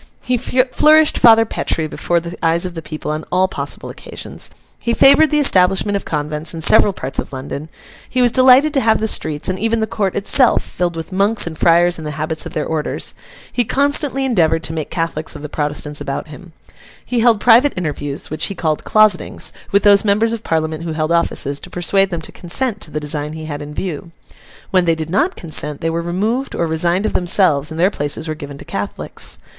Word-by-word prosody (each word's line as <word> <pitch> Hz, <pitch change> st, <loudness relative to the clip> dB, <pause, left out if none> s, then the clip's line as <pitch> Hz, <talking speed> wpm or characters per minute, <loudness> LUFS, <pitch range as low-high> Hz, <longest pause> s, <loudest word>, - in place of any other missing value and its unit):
He 250 Hz, -, 0 dB
flourished 265 Hz, +5 st, +3 dB
Father 225 Hz, -1 st, +6 dB
Petre 160 Hz, -6 st, -2 dB
before 170 Hz, +3 st, -1 dB
the 170 Hz, +1 st, -8 dB
eyes 165 Hz, +2 st, +1 dB
of 180 Hz, -, -5 dB
the 165 Hz, -, -6 dB
people 155 Hz, -1 st, -6 dB
on 155 Hz, +1 st, -4 dB
all 185 Hz, +1 st, +2 dB
possible -, -, -5 dB
occasions. -, -, -6 dB, 0.3 s
He 235 Hz, 0 st, -1 dB
favoured 280 Hz, +3 st, +6 dB
the 300 Hz, -, +1 dB
establishment 195 Hz, -6 st, +3 dB
of 200 Hz, -, -3 dB
convents 150 Hz, +1 st, -3 dB
in 165 Hz, -, -6 dB
several 200 Hz, -, +5 dB
parts 135 Hz, -7 st, -6 dB
of -, -, -4 dB
London. 140 Hz, +3 st, -7 dB, 0.4 s
He 255 Hz, -, -2 dB
was 245 Hz, -1 st, +4 dB
delighted 260 Hz, +4 st, +5 dB
to 275 Hz, -, +2 dB
have 220 Hz, -2 st, +2 dB
the 220 Hz, -, -1 dB
streets, 155 Hz, -7 st, -2 dB
and 185 Hz, 0 st, -2 dB
even 225 Hz, +1 st, 0 dB
the 220 Hz, -, 0 dB
court 210 Hz, -4 st, -2 dB
itself, 235 Hz, +5 st, +4 dB
filled 175 Hz, -1 st, -3 dB
with 165 Hz, +3 st, -7 dB
Monks 200 Hz, +3 st, +3 dB
and 170 Hz, -2 st, -6 dB
Friars 170 Hz, +2 st, +3 dB
in -, -, -8 dB
the 150 Hz, 0 st, -6 dB
habits 160 Hz, +1 st, -2 dB
of -, -, -11 dB
their 155 Hz, -, -2 dB
orders. 155 Hz, -2 st, -3 dB, 0.4 s
He 245 Hz, -, +1 dB
constantly 280 Hz, +1 st, +1 dB
endeavoured 165 Hz, -9 st, +1 dB
to 160 Hz, -, -4 dB
make 155 Hz, -2 st, -4 dB
Catholics 165 Hz, -2 st, -3 dB
of -, -, -9 dB
the 150 Hz, -, -6 dB
Protestants 150 Hz, 0 st, -2 dB
about 140 Hz, +2 st, -5 dB
him. 170 Hz, +2 st, -13 dB, 0.5 s
He 245 Hz, -, -1 dB
held 230 Hz, -2 st, +4 dB
private 245 Hz, +6 st, +5 dB
interviews, 145 Hz, -4 st, -4 dB
which 155 Hz, -, -1 dB
he 200 Hz, -, -5 dB
called 155 Hz, -3 st, -2 dB
'closetings,' 215 Hz, -4 st, +2 dB, 0.2 s
with 200 Hz, 0 st, +2 dB
those 200 Hz, -1 st, +6 dB
Members 215 Hz, +2 st, +1 dB
of 225 Hz, -1 st, -5 dB
Parliament 160 Hz, 0 st, -2 dB
who 165 Hz, -1 st, -4 dB
held 155 Hz, +1 st, -2 dB
offices, 145 Hz, -4 st, 0 dB
to -, -, -11 dB
persuade 195 Hz, +3 st, +1 dB
them 170 Hz, -3 st, -4 dB
to -, -, -8 dB
consent 210 Hz, +4 st, 0 dB
to -, -, -3 dB
the 150 Hz, -, -4 dB
design 150 Hz, 0 st, -3 dB
he 160 Hz, 0 st, -7 dB
had 145 Hz, -2 st, -6 dB
in 145 Hz, 0 st, -8 dB
view. 170 Hz, 0 st, -5 dB, 0.6 s
When 185 Hz, -3 st, +3 dB
they 165 Hz, -1 st, +2 dB
did 160 Hz, 0 st, -6 dB
not 305 Hz, -, +1 dB
consent, 150 Hz, -3 st, -1 dB
they 165 Hz, -, -2 dB
were 165 Hz, +1 st, -2 dB
removed, 210 Hz, +10 st, -2 dB
or 170 Hz, -, 0 dB
resigned 170 Hz, +4 st, 0 dB
of -, -, -1 dB
themselves, 170 Hz, -5 st, +2 dB
and 160 Hz, 0 st, -7 dB
their 185 Hz, +4 st, +3 dB
places 145 Hz, +1 st, -3 dB
were 155 Hz, -, -2 dB
given 145 Hz, -2 st, -9 dB
to -, -, -12 dB
Catholics. -, -, -4 dB
175 Hz, 215 wpm, -17 LUFS, 155-220 Hz, 0.6 s, Father